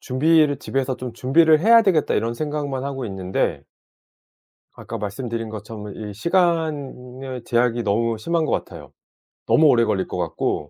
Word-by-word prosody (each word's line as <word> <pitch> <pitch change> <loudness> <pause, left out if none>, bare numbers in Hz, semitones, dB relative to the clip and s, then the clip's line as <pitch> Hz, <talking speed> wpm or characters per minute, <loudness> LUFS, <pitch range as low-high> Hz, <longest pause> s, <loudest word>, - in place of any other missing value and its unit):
준비를 150 +2 +2
'집에서 130 -1 -2
좀 125 -2 -6
준비를 155 +6 +4
해야 230 +3 +6
되겠다.' 180 -7 +2
이런 115 +1 -1
생각만 145 -2 -3
하고 135 -2 -4
있는데 95 -2 -2 1.1
아까 115 - -8
말씀드린 115 +2 -4
것처럼 105 -1 -8
이 105 -2 -7
시간의 135 - -2
제약이 120 0 +1
너무 115 +2 0
심한 165 +7 -1
것 - - -2
같아요. - - -5 0.5
너무 160 - +4
오래 120 -4 +5
걸릴 105 -4 0
것 - - -5
같고 80 -3 -2
125 Hz, 325 characters per minute, -22 LUFS, 110-150 Hz, 1.1 s, 해야